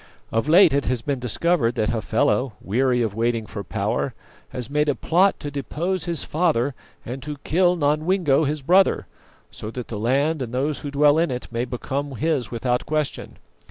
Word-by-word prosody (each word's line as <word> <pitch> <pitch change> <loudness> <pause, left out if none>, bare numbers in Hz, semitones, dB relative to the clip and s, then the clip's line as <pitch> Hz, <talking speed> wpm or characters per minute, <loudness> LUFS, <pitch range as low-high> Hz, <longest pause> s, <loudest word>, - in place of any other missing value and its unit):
Of 115 +6 0
late 175 -1 +7
it 140 -1 +1
has 125 -2 -1
been 140 -3 -1
discovered 125 +1 +1
that 110 -3 0
Hafela, 110 - 0
weary 125 +3 +1
of 110 -3 -2
waiting 115 0 0
for 100 -1 -7
power, - - -2 0.3
has 125 -2 -5
made 150 +1 +1
a 145 - +1
plot 185 +4 +2
to 145 - -4
depose 165 +6 -2
his 170 -4 -1
father 150 -6 +1 0.3
and 130 +3 -6
to 150 +2 -6
kill 180 +2 +3
Nodwengo, 155 0 +2
his 150 -1 -3
brother, 185 +6 +4 0.5
so 105 - -7
that 125 +1 -7
the 105 - -4
land 140 +7 +1
and 125 -1 -4
those 140 +3 0
who 145 - -5
dwell 145 +2 +4
in 170 - +2
it 125 -1 -5
may 120 +1 -1
become 135 +3 -4
his 150 -1 -1
without 125 +1 -1
question. 155 -2 -2
140 Hz, 185 wpm, -23 LUFS, 120-155 Hz, 0.5 s, late